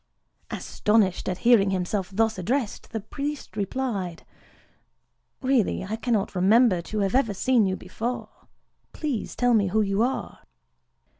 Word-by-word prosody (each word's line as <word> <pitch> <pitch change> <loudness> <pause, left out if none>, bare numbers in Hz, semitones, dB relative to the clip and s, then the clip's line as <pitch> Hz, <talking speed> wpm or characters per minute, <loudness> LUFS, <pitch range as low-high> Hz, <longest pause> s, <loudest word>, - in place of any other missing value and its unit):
Astonished 210 -5 +1
at 180 - -2
hearing 225 -5 +6
himself 185 0 -1
thus 220 0 +1
addressed, 235 +4 -2
the 220 - -3
priest 285 +6 -5
replied:—"Really, 215 +3 -4
I 210 +3 -3
cannot 225 -3 -1
remember 195 +1 +4
to 215 +5 -4
have 195 -1 0
ever 235 -6 +2
seen 230 +1 +3
you 185 - 0
before: 225 +7 -6 0.5
please 285 -8 -3
tell 245 -1 +2
me 205 -3 +3
who 215 +4 +2
you 195 +1 0
are." 255 +3 -2
215 Hz, 130 wpm, -25 LUFS, 195-245 Hz, 0.5 s, hearing